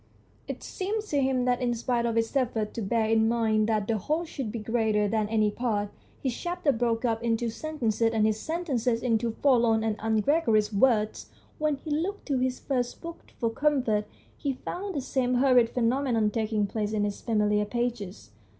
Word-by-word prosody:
It - - -6
seemed 415 +3 -3
to 285 -2 +1
him 260 -2 +1
that 250 0 +1
in 240 -1 +1
spite 235 0 0
of 230 - -1
his 225 +3 0
effort 225 -5 0
to 230 - -4
bear 220 +2 +1
in 220 0 +3
mind 220 -2 +2
that 215 -2 0
the 220 -2 0
whole 310 - -1
should 270 -8 -5
be 235 - -4
greater 220 -1 +1
than 215 0 0
any 215 -1 +2
part, 210 -3 -1 0.3
his 260 -4 -1
chapters 345 -5 0
broke 230 0 0
up 225 -1 0
into 230 0 0
sentences 230 -5 -1
and 220 -2 +2
his 215 0 +1
sentences 260 -7 -1
into 230 -1 +1
forlorn 235 -5 +4
and 220 -1 -1
ungregarious 220 -1 +2
words. 215 -1 +2 0.3
When 305 -1 +1
he 295 +3 -8
looked 350 +7 -2
to 270 -2 +1
his 255 0 -1
first 250 -3 -2
book 335 0 -10
for 230 -2 0
comfort 245 -6 +1 0.3
he 280 -2 -2
found 375 +8 -5
the 280 - -1
same 255 -1 0
horrid 250 -2 +4
phenomenon 235 -3 +1
taking 215 -1 0
place 210 +1 -3
in 205 -1 +1
its 205 -1 -4
familiar 210 -2 +1
pages. 205 - -4
230 Hz, 185 wpm, -27 LUFS, 215-265 Hz, 0.3 s, forlorn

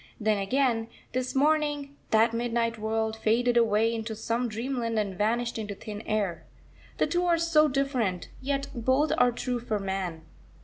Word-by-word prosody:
Then 215 -2 +1
again, 230 +2 +1 0.2
this 255 +1 -2
morning, 290 0 +1
that 225 +1 +4
midnight 230 -1 -1
world 220 0 -1
faded 235 +2 +2
away 225 -1 +3
into 225 -1 -4
some 230 +2 -1
dreamland, 230 0 -2
and 200 -3 -1
vanished 230 +4 0
into 205 -2 -4
thin 210 0 -7
air. 205 -5 -1 0.5
The - - +3
two 350 +1 0
are 340 -1 +4
so 330 -2 +4
different, 255 - -1
yet 275 +1 -1
both 260 +6 +2
are 245 - +5
true 245 +1 -2
for 220 -2 -2
man. 190 -4 -3
230 Hz, 160 wpm, -28 LUFS, 215-260 Hz, 0.5 s, are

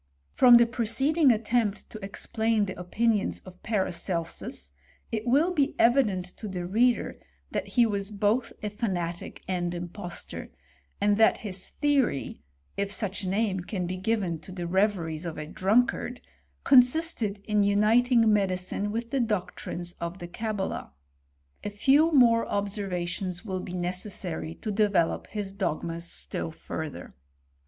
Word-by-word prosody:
From 240 - +8
the 235 - +6
preceding 260 +6 +2
attempt 220 -2 0
to 215 -2 -9
explain 220 +2 0
the 190 - -5
opinions 205 +4 0
of 185 -1 -14
Paracelsus, 170 - -3 0.4
it 220 +1 -3
will 300 +9 +3
be 295 -3 +1
evident 230 -7 +3
to 215 - -6
the 180 -3 -4
reader 235 +6 +1 0.3
that - - -2
he 240 -2 +4
was 200 -2 -2
both 215 +4 0
a 210 - -2
fanatic 180 -6 -3
and 175 -2 -1
impostor, 175 +1 -6 0.5
and 205 0 +3
that 225 - +4
his 190 -2 -4
theory 275 - 0 0.4
(if 200 0 -1
such 200 -1 -1
a 185 - -2
name 200 -1 0
can 180 +1 -3
be 180 +1 -3
given 190 -4 -1
to 175 - -12
the 180 -2 -5
reveries 175 -4 0
of 170 -2 -5
ik 150 +1 -7
drunkard), 245 +5 +1 0.4
consisted 250 -4 +4
in 210 -1 +3
uniting 220 +3 +4
medicine 195 0 0
with 230 +2 -4
the 275 - +1
doo' 215 -6 0
trines 175 0 -4
of 170 +2 -4
the 175 - -7
Cabala. 200 - -4 0.7
A - - -2
few 275 +10 +4
more 235 -5 +5
observations 190 -2 -3
will 190 -3 -3
be 180 - -7
necessary 180 -2 -3
to 215 - -1
develop 200 -5 +1
his 205 -2 -4
dogmas 170 -3 -2
still - - -4
further. 160 -2 -7
205 Hz, 145 wpm, -27 LUFS, 180-230 Hz, 0.7 s, From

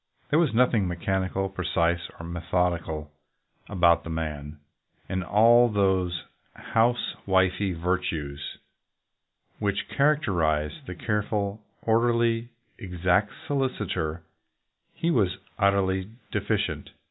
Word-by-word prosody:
There 150 - +5
was 165 -5 +3
nothing 115 -4 +3
mechanical, 95 +2 -1
precise, 85 -2 0
or 85 - -7
methodical 85 -3 -1 0.6
about 85 -4 +4
the - - -8
man, 75 -2 -4 0.5
and 95 0 -2
in 90 - -7
all 120 +3 +6
those 95 -5 +1 0.3
house 120 +2 +1
wifely 95 0 +2
virtues 80 -5 -3 1.0
which 100 -2 -1
characterize 85 - +2 0.2
the 90 - -5
careful, 105 0 -1 0.2
orderly, 115 0 +2 0.3
exact 90 0 +1
solicitor 95 - -2 0.7
he 170 - 0
was 100 - +2 0.2
utterly 95 -1 +2 0.2
deficient. - - -1
95 Hz, 100 wpm, -26 LUFS, 85-110 Hz, 1.0 s, all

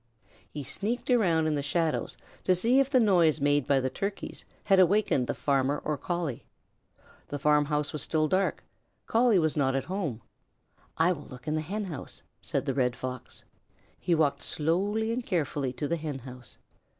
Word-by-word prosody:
He 145 - -6
sneaked 220 - -2
around 175 -10 +3
in 155 - +1
the 145 - 0
shadows 160 +3 -1 0.3
to 185 - +4
see 235 +9 +4
if 275 -1 +2
the 265 -2 +4
noise 175 -8 +4
made 145 -1 +2
by 140 -1 +4
the 130 0 -1
turkeys 200 +7 -4 0.2
had 195 -2 +4
awakened 185 - +3
the - - -2
farmer 140 0 +1
or 150 - 0
Collie. 165 -3 -3 0.8
The 145 - -4
farmhouse 150 +1 +2
was 150 - -1
still 155 +2 +1
and 155 - 0
dark. 190 +1 +1 0.4
Collie 230 -2 +4
was 160 -3 +2
not 135 -3 +1
at 135 - 0
home. 165 - -3 0.7
"I 165 +3 +4
will 150 -5 -5
look 125 0 -12
at 155 - 0
the 155 - 0
Hen 200 +7 -3
house," 155 -8 -5 0.2
said - - -1
the - - 0
Red 125 -3 +1
Fox. 130 +1 -7 0.6
He 175 - +1
walked 145 -3 +1
slowly 200 +8 0
and 245 +1 -2
carefully 145 - -1
to 145 +3 -3
the 170 - 0
Hen 150 -3 -4
house. 125 -1 -10
155 Hz, 185 wpm, -28 LUFS, 140-190 Hz, 0.8 s, to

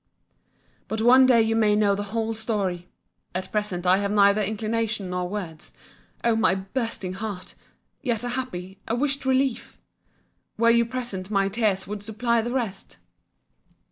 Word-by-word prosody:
— - - -39
But 220 - -3
one 255 +2 +7
day 235 -3 +5
you 225 0 0
may 215 -2 +3
know 205 -1 +3
the 205 +1 -3
whole 225 +1 -1
story!—At 190 -4 -5
present 210 -4 -2
I 180 +1 +5
have 200 0 -1
neither 200 0 +4
inclination 215 -1 -2
nor 180 0 -2
words—O 200 +4 -5
my 220 -4 +3
bursting 195 -1 -4
heart!—Yet 215 +4 -6
a 245 - -2
happy, 190 -7 -5
a 230 - 0
wished 275 +1 -1
relief!—Were 260 -3 -2
you 235 0 +4
present 235 -7 -4
my 195 -2 +1
tears 200 -3 0
would 205 0 -6
supply 225 +2 0
the 240 +2 -4
rest! 225 -7 -4
215 Hz, 140 wpm, -25 LUFS, 195-235 Hz, -, one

